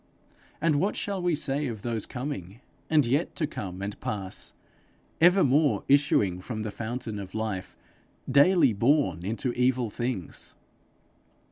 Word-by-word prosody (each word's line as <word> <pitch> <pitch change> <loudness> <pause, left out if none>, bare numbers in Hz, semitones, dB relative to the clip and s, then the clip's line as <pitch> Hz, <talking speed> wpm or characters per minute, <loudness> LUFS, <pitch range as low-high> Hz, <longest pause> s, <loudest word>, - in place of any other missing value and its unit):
And 155 -1 +2
what 195 +7 +1
shall 200 -2 -2
we 175 -2 +2
say 145 0 -1
of 110 -4 -6
those 115 -3 -2
coming, 120 - -5 0.3
and 155 -4 +4
yet 140 +8 0
to 155 - 0
come 95 -9 -6
and 100 +1 -5
pass 95 -3 -3 0.7
evermore 160 -5 +4
issuing 105 -10 +3
from 110 +2 -5
the 110 - -4
fountain 115 -1 -4
of 95 0 -8
life, 110 -4 -3 0.5
daily 145 - +5
born 125 - +2
into 115 +5 -2
evil 125 -2 +1
things? 120 -7 -4
125 Hz, 135 wpm, -27 LUFS, 105-145 Hz, 0.7 s, daily